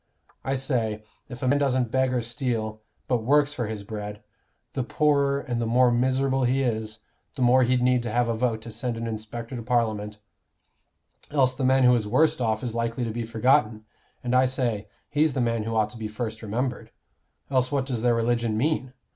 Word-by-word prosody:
I 135 Hz, -, -1 dB
say, 115 Hz, -5 st, -1 dB, 0.3 s
if 125 Hz, -1 st, -8 dB
a -, -, +1 dB
man 140 Hz, +2 st, +3 dB
doesn't 130 Hz, -4 st, +1 dB
beg 130 Hz, 0 st, +2 dB
or 125 Hz, -2 st, 0 dB
steal, 115 Hz, -3 st, -3 dB, 0.3 s
but 125 Hz, -3 st, +1 dB
works 145 Hz, +3 st, +3 dB
for 120 Hz, -6 st, -3 dB
his 105 Hz, -2 st, -5 dB
bread, 105 Hz, 0 st, -7 dB, 0.5 s
the 130 Hz, -, -1 dB
poorer 140 Hz, +2 st, +2 dB
and 120 Hz, -3 st, -3 dB
the 115 Hz, -, -1 dB
more 125 Hz, +2 st, +4 dB
miserable 130 Hz, +2 st, +1 dB
he 130 Hz, +2 st, +2 dB
is, 110 Hz, -2 st, -3 dB, 0.3 s
the 130 Hz, -, -1 dB
more 125 Hz, +2 st, +5 dB
he'd 125 Hz, 0 st, +2 dB
need 125 Hz, -1 st, +3 dB
have 120 Hz, +1 st, +1 dB
a 115 Hz, -, 0 dB
vote 110 Hz, -2 st, -1 dB
to 115 Hz, -, -8 dB
send 120 Hz, +1 st, -3 dB
an 115 Hz, -, -4 dB
inspector 115 Hz, +3 st, -5 dB
to 120 Hz, -, -4 dB
Parliament 110 Hz, -3 st, -1 dB, 1.1 s
else 130 Hz, -3 st, +2 dB
the 130 Hz, +1 st, -4 dB
man 130 Hz, 0 st, +4 dB
who 125 Hz, 0 st, +6 dB
is 115 Hz, -4 st, +1 dB
worst 130 Hz, +5 st, +2 dB
off 110 Hz, -1 st, 0 dB
is 120 Hz, -3 st, -3 dB
likely 115 Hz, +1 st, -2 dB
to 115 Hz, -, -2 dB
be 115 Hz, 0 st, -4 dB
forgotten; 115 Hz, -2 st, +2 dB, 0.4 s
and 125 Hz, 0 st, -1 dB
I 130 Hz, +1 st, +5 dB
say, 120 Hz, -5 st, -1 dB, 0.2 s
he's 150 Hz, 0 st, +2 dB
the 130 Hz, -, -2 dB
man 115 Hz, -3 st, 0 dB
who 115 Hz, 0 st, -2 dB
ought 105 Hz, -1 st, +1 dB
to 120 Hz, -, -11 dB
be 110 Hz, -, -3 dB
first 110 Hz, 0 st, -5 dB
remembered. 120 Hz, +4 st, -3 dB, 0.6 s
Else 130 Hz, -1 st, +2 dB
what 140 Hz, -2 st, 0 dB
does 125 Hz, -5 st, -3 dB
their 120 Hz, 0 st, +3 dB
religion 115 Hz, -1 st, 0 dB
mean? 130 Hz, 0 st, 0 dB
120 Hz, 205 wpm, -25 LUFS, 110-130 Hz, 1.1 s, who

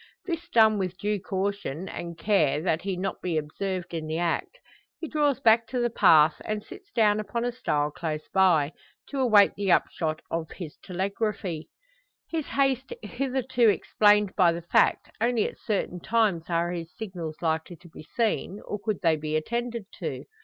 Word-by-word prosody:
This 340 Hz, -1 st, -4 dB
done 220 Hz, -6 st, +5 dB
with 185 Hz, -1 st, -3 dB
due 210 Hz, +1 st, -1 dB
caution, 190 Hz, -3 st, -3 dB
and 170 Hz, -2 st, -6 dB
care 165 Hz, -7 st, +2 dB
that 165 Hz, -3 st, +1 dB
he 195 Hz, 0 st, -2 dB
be -, -, -6 dB
not 195 Hz, 0 st, -2 dB
observed 175 Hz, +3 st, -3 dB
in 160 Hz, -2 st, -3 dB
the 160 Hz, +1 st, -2 dB
act, 175 Hz, -, -1 dB, 0.4 s
he 325 Hz, -, -4 dB
draws 290 Hz, -4 st, +1 dB
back 230 Hz, 0 st, +4 dB
to 250 Hz, -, -2 dB
the 240 Hz, -1 st, +1 dB
path, 160 Hz, -8 st, +5 dB
and 215 Hz, -1 st, -3 dB
sits 390 Hz, -, -13 dB
down 215 Hz, -2 st, +3 dB
upon 230 Hz, +3 st, -2 dB
a 245 Hz, -, 0 dB
stile 150 Hz, -12 st, -1 dB
close 155 Hz, -1 st, -4 dB
by 170 Hz, -6 st, +4 dB, 0.4 s
to 280 Hz, -, -3 dB
await 215 Hz, -6 st, +5 dB
the 200 Hz, -2 st, -1 dB
upshot 155 Hz, -2 st, +1 dB
of 165 Hz, -1 st, -2 dB
his 165 Hz, -5 st, -7 dB
telegraphy. 190 Hz, -2 st, -3 dB, 0.6 s
His 320 Hz, -3 st, -2 dB
haste 270 Hz, -1 st, 0 dB
hitherto 250 Hz, +1 st, +1 dB
explained 210 Hz, -1 st, +3 dB
by 180 Hz, -4 st, +5 dB
the 170 Hz, 0 st, -6 dB
fact, 175 Hz, -, +2 dB
only 235 Hz, -1 st, +2 dB
at -, -, -10 dB
certain 195 Hz, -4 st, -2 dB
times 205 Hz, -5 st, +1 dB
are 170 Hz, 0 st, +1 dB
his 170 Hz, -1 st, -5 dB
signals 175 Hz, -7 st, -6 dB
likely 160 Hz, +2 st, -1 dB
to 175 Hz, +1 st, -17 dB
be 160 Hz, -, -12 dB, 0.2 s
seen, 220 Hz, -3 st, 0 dB
or 210 Hz, -, -4 dB
could 215 Hz, -3 st, -2 dB
they 165 Hz, -2 st, +4 dB
be 155 Hz, 0 st, -3 dB
attended 235 Hz, +6 st, -2 dB
to. -, -, -4 dB
195 Hz, 175 wpm, -27 LUFS, 170-230 Hz, 0.6 s, done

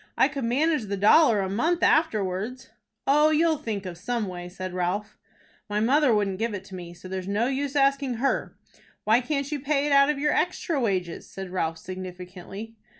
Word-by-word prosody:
"I -, -, +5 dB
could 275 Hz, -4 st, -4 dB
manage 290 Hz, +2 st, +1 dB
the 200 Hz, 0 st, -3 dB
dollar 215 Hz, +2 st, +5 dB
a 190 Hz, -, -1 dB
month 315 Hz, -, 0 dB
afterwards." 215 Hz, -, +1 dB, 0.4 s
"Oh, 300 Hz, +3 st, +5 dB
you'll 315 Hz, 0 st, +2 dB
think 215 Hz, -8 st, -4 dB
of 175 Hz, -2 st, -7 dB
some 235 Hz, +3 st, -2 dB
way," 180 Hz, -2 st, -7 dB
said 185 Hz, 0 st, -6 dB
Ralph. 185 Hz, +3 st, -2 dB, 0.5 s
"My 205 Hz, 0 st, 0 dB
mother 265 Hz, +5 st, +3 dB
wouldn't 200 Hz, -3 st, +1 dB
give 225 Hz, -1 st, -1 dB
it 190 Hz, -, -6 dB
to 190 Hz, -, -10 dB
me, 175 Hz, -1 st, -8 dB
so 180 Hz, +2 st, -11 dB
there's 185 Hz, 0 st, -5 dB
no 205 Hz, +4 st, +1 dB
use 275 Hz, +2 st, -2 dB
asking 275 Hz, -2 st, +2 dB
her." 265 Hz, +4 st, -1 dB, 0.5 s
"Why 225 Hz, +3 st, +4 dB
can't 280 Hz, +2 st, -2 dB
you 295 Hz, -, -2 dB
pay 285 Hz, +1 st, 0 dB
it 295 Hz, -, 0 dB
out 275 Hz, 0 st, +6 dB
of 300 Hz, -, +1 dB
your 295 Hz, +1 st, +1 dB
extra 345 Hz, -4 st, 0 dB
wages?" 185 Hz, -6 st, -2 dB
said 190 Hz, -1 st, -7 dB
Ralph, 165 Hz, -3 st, -1 dB
significantly. 185 Hz, +4 st, -8 dB
220 Hz, 195 wpm, -26 LUFS, 185-280 Hz, 0.5 s, out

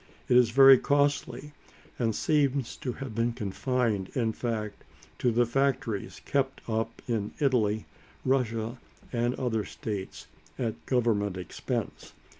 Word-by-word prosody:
It 125 Hz, -, +3 dB
is 125 Hz, -2 st, +6 dB
very 135 Hz, +1 st, +8 dB
costly, 145 Hz, +1 st, 0 dB, 0.5 s
and 115 Hz, -3 st, +1 dB
seems 140 Hz, -4 st, +1 dB
to 125 Hz, -, -4 dB
have 135 Hz, -3 st, -7 dB
been 115 Hz, +2 st, 0 dB
confined, 110 Hz, -2 st, -1 dB
in 115 Hz, -3 st, +1 dB
fact, 110 Hz, -4 st, -4 dB, 0.4 s
to 125 Hz, -, +2 dB
the 120 Hz, +1 st, +3 dB
factories 120 Hz, -4 st, -1 dB
kept 135 Hz, -1 st, 0 dB
up 115 Hz, 0 st, -2 dB
in 110 Hz, -4 st, -2 dB
Italy, 110 Hz, -7 st, +2 dB, 0.4 s
Russia, 120 Hz, -3 st, 0 dB, 0.3 s
and 120 Hz, +1 st, +1 dB
other 115 Hz, -4 st, -1 dB
states, 100 Hz, -2 st, -6 dB, 0.3 s
at 115 Hz, -3 st, -3 dB
government 110 Hz, -6 st, +1 dB
expense. 90 Hz, -, -4 dB
120 Hz, 125 wpm, -28 LUFS, 110-130 Hz, 0.5 s, very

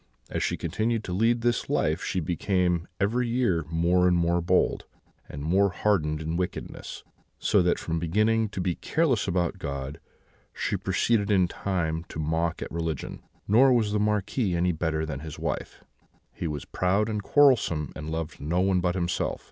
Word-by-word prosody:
As -, -, -2 dB
she -, -, 0 dB
continued 115 Hz, 0 st, -1 dB
to 90 Hz, -, -5 dB
lead 115 Hz, +5 st, +2 dB
this 120 Hz, 0 st, 0 dB
life -, -, +1 dB
she 95 Hz, -, -1 dB
became 90 Hz, 0 st, 0 dB
every 120 Hz, +5 st, +1 dB
year 115 Hz, -10 st, +1 dB
more 85 Hz, +2 st, +3 dB
and 90 Hz, -1 st, +3 dB
more 85 Hz, +1 st, +2 dB
bold, 90 Hz, +2 st, +1 dB, 0.4 s
and 70 Hz, 0 st, -7 dB
more 95 Hz, +6 st, +3 dB
hardened 80 Hz, -7 st, 0 dB
in 80 Hz, +2 st, -2 dB
wickedness; 90 Hz, 0 st, -5 dB, 0.3 s
so 100 Hz, -, +3 dB
that, 90 Hz, 0 st, +2 dB
from 85 Hz, 0 st, -2 dB
beginning 105 Hz, +6 st, +1 dB
to 95 Hz, -, -6 dB
be 90 Hz, -1 st, 0 dB
careless 135 Hz, -, 0 dB
about 90 Hz, +1 st, 0 dB
God, 70 Hz, -2 st, -5 dB, 0.5 s
she -, -, -1 dB
proceeded 110 Hz, -4 st, +1 dB
in 95 Hz, -3 st, +4 dB
time 85 Hz, -3 st, -2 dB
to -, -, -8 dB
mock 80 Hz, +2 st, -1 dB
at -, -, -8 dB
religion. 80 Hz, -3 st, -4 dB, 0.3 s
Nor 125 Hz, +6 st, +6 dB
was 110 Hz, -4 st, +2 dB
the 105 Hz, -, +1 dB
Marquis 105 Hz, -1 st, 0 dB
any 90 Hz, +1 st, +2 dB
better 80 Hz, -1 st, -1 dB
than 75 Hz, -3 st, -5 dB
his 80 Hz, 0 st, -8 dB
wife; -, -, -4 dB, 0.5 s
he 85 Hz, -, -4 dB
was 75 Hz, -2 st, -4 dB
proud 100 Hz, +4 st, +1 dB
and 105 Hz, -2 st, -2 dB
quarrelsome, 110 Hz, -, +3 dB
and 75 Hz, 0 st, -6 dB
loved 80 Hz, 0 st, -4 dB
no 80 Hz, +5 st, 0 dB
one 95 Hz, 0 st, +3 dB
but 90 Hz, 0 st, 0 dB
himself. 90 Hz, -1 st, -1 dB
90 Hz, 175 wpm, -27 LUFS, 80-105 Hz, 0.5 s, Nor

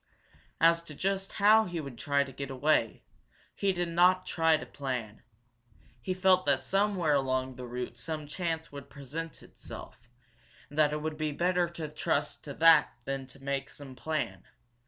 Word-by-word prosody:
As 165 Hz, 0 st, +5 dB
to 150 Hz, -, -10 dB
just 195 Hz, +3 st, -2 dB
how 215 Hz, +2 st, +5 dB
he 175 Hz, -2 st, -4 dB
would 140 Hz, -5 st, -6 dB
try 140 Hz, -1 st, +2 dB
to 140 Hz, -, -10 dB
get 140 Hz, +1 st, -6 dB
away, 135 Hz, -3 st, +1 dB, 0.5 s
he 200 Hz, -, +1 dB
did 175 Hz, -2 st, -2 dB
not 180 Hz, +2 st, +4 dB
try 165 Hz, -3 st, +3 dB
to -, -, -7 dB
plan. 125 Hz, -6 st, -5 dB, 0.8 s
He 185 Hz, +10 st, -2 dB
felt 185 Hz, 0 st, +4 dB
that 140 Hz, -2 st, +2 dB
somewhere 195 Hz, -5 st, +1 dB
along 130 Hz, -1 st, 0 dB
the 125 Hz, 0 st, -7 dB
route 120 Hz, 0 st, -5 dB
some 155 Hz, +4 st, -4 dB
chance 160 Hz, +1 st, -3 dB
would 140 Hz, -1 st, -9 dB
present 150 Hz, +4 st, -7 dB
itself, -, -, -11 dB, 0.6 s
and 145 Hz, -, -5 dB
that 150 Hz, -1 st, +5 dB
it 150 Hz, 0 st, -3 dB
would 155 Hz, -1 st, -3 dB
be 155 Hz, -1 st, -1 dB
better 175 Hz, +3 st, +1 dB
to 170 Hz, -2 st, -6 dB
trust 150 Hz, -1 st, -2 dB
to 140 Hz, -2 st, -7 dB
that 165 Hz, +1 st, +6 dB
than 135 Hz, -1 st, -3 dB
to 135 Hz, +2 st, -17 dB
make 140 Hz, 0 st, -2 dB
some 135 Hz, -3 st, -10 dB
plan. 125 Hz, -, -3 dB
150 Hz, 175 wpm, -30 LUFS, 135-170 Hz, 0.8 s, that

